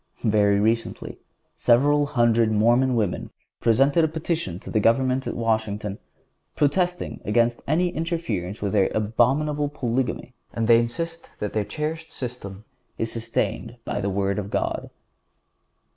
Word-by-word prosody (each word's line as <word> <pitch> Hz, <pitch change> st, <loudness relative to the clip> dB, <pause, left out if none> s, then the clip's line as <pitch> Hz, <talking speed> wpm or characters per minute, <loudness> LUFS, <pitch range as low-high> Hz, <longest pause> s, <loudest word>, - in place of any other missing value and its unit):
Very 105 Hz, -2 st, +3 dB
recently 115 Hz, +2 st, -1 dB, 0.4 s
several 145 Hz, +4 st, +3 dB
hundred 115 Hz, -4 st, +3 dB
Mormon 120 Hz, +4 st, +3 dB
women 105 Hz, -6 st, -1 dB, 0.3 s
presented 135 Hz, +8 st, +3 dB
a -, -, +4 dB
petition 160 Hz, -, -3 dB
to -, -, -8 dB
the 110 Hz, -, +2 dB
government 130 Hz, +4 st, +2 dB
at -, -, -3 dB
Washington 110 Hz, -3 st, -1 dB, 0.6 s
protesting 175 Hz, +5 st, 0 dB
against 120 Hz, +2 st, +1 dB
any 175 Hz, +5 st, +2 dB
interference 155 Hz, -, -3 dB
with 100 Hz, -, -1 dB
their 100 Hz, -2 st, +3 dB
abominable 145 Hz, +7 st, +1 dB
polygamy 125 Hz, -3 st, -2 dB, 0.2 s
and 115 Hz, -1 st, -1 dB
they 115 Hz, -1 st, +7 dB
insist 165 Hz, +8 st, -4 dB
that 105 Hz, -, -4 dB
their 105 Hz, -2 st, 0 dB
cherished 160 Hz, +4 st, -4 dB
system 110 Hz, -5 st, -7 dB, 0.3 s
is 115 Hz, -, -2 dB
sustained 115 Hz, +1 st, -2 dB
by 100 Hz, -, -2 dB
the 100 Hz, -, -1 dB
Word 100 Hz, +1 st, 0 dB
of 100 Hz, -1 st, -5 dB
God. -, -, -2 dB
120 Hz, 135 wpm, -24 LUFS, 105-145 Hz, 0.6 s, they